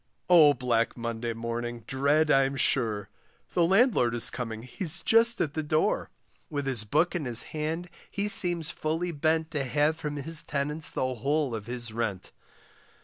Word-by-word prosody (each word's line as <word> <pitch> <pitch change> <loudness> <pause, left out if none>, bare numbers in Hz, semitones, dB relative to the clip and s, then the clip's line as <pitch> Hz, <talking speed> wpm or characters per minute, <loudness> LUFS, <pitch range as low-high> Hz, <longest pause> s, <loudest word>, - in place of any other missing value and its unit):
Oh, 155 -5 +7
black 120 -2 -1
Monday 115 0 -4
morning 115 +1 -5
dread 145 +4 +1
I'm 135 0 +3
sure, 110 -6 0 0.5
The 175 - +2
landlord 190 - +3
is 120 - +3
coming, 115 -3 -6
he's 155 +6 -6
just 230 +1 +3
at 145 - -1
the 155 - -2
door; 155 +1 0 0.4
With 145 -2 -3
his 125 -5 -2
book 155 +11 +1
in 165 -5 -2
his 120 -2 +4
hand 160 +3 -3 0.2
he 200 +1 -2
seems 175 -5 +4
fully 165 +3 -3
bent 160 +1 0
To 150 -4 -2
have 145 +4 0
from 150 -2 -5
his 150 +2 +2
tenants 150 +2 -3
the 130 0 -2
whole 140 +3 -1
of 110 -1 -6
his 120 -2 -4
rent. 110 -5 -4
145 Hz, 165 wpm, -27 LUFS, 120-160 Hz, 0.5 s, Oh